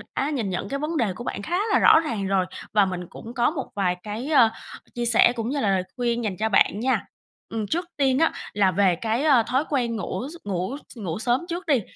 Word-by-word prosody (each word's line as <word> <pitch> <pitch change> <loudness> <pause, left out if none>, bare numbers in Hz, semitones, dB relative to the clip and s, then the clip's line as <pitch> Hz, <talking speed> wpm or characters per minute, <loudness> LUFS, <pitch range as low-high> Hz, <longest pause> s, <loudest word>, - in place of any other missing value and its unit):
đã 275 - 0
nhìn 245 -9 -2
nhận 185 +2 -3
cái 275 - -2
vấn 310 +3 -2
đề 225 -8 +1
của 240 - -7
bạn 240 - -4
khá 345 - -1 0.2
là - - +5
rõ - - +7
ràng 225 -11 -3
rồi, 190 -1 +2 0.3
và 205 -2 +5
mình 180 -2 -4
cũng 230 - -10
có 245 +1 +2
một 280 -5 -5
vài 185 -3 +1
cái, 215 +5 -5
ơ, 255 -7 +6 0.5
chia 240 0 -2
sẻ 235 0 +5
cũng 230 -1 -3
như 285 +2 -1
là 215 - +1
lời 190 -1 +1
khuyên 240 -1 0
dành 200 -4 -2
cho 220 +1 0
bạn 200 0 +3
nha. 260 +3 0 0.4
Ừm, 220 -2 -3
trước 345 - -1
tiên 270 -2 +2
á 325 - +3 0.2
là 195 -2 +3
về 185 -1 +3
cái, 225 - -1
a, 275 -7 +5
thói 260 +5 0
quen 245 -5 0
ngủ 195 -1 -4
s - - -10
ngủ 190 +7 -2
s - - -14
ngủ 185 -4 -4
sớm 245 +4 +1
trước 345 +1 -4
đi, 280 -7 +3
235 Hz, 250 wpm, -24 LUFS, 200-270 Hz, 0.5 s, rõ